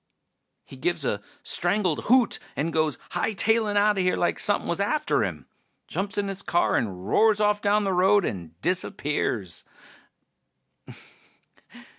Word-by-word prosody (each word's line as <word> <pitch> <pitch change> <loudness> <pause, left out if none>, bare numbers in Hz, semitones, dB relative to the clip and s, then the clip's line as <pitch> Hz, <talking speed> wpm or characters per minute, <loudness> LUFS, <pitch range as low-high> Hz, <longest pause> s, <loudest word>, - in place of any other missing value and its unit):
He 135 - -13
gives 165 +1 -1
a 100 -4 -1 0.2
strangled 180 -2 +1
hoot 250 0 +3 0.2
and 160 +3 -2
goes 155 -3 +1
hightailin' 220 0 +1
outta 205 -1 +3
here 180 0 +1
like 175 - 0
somepin' 205 - 0
was 170 - -2
after 300 +10 +1
him. - - -5 0.4
Jumps 195 +1 -3
in 205 -1 0
his 195 0 -4
car 175 -2 +1
and 95 -4 -2
roars 220 - +3
off 210 0 +2
down 205 +1 +2
the 195 -1 0
road 190 +1 +4
and 85 -4 -6
disappears. 150 - -2
190 Hz, 135 wpm, -25 LUFS, 155-205 Hz, 0.4 s, road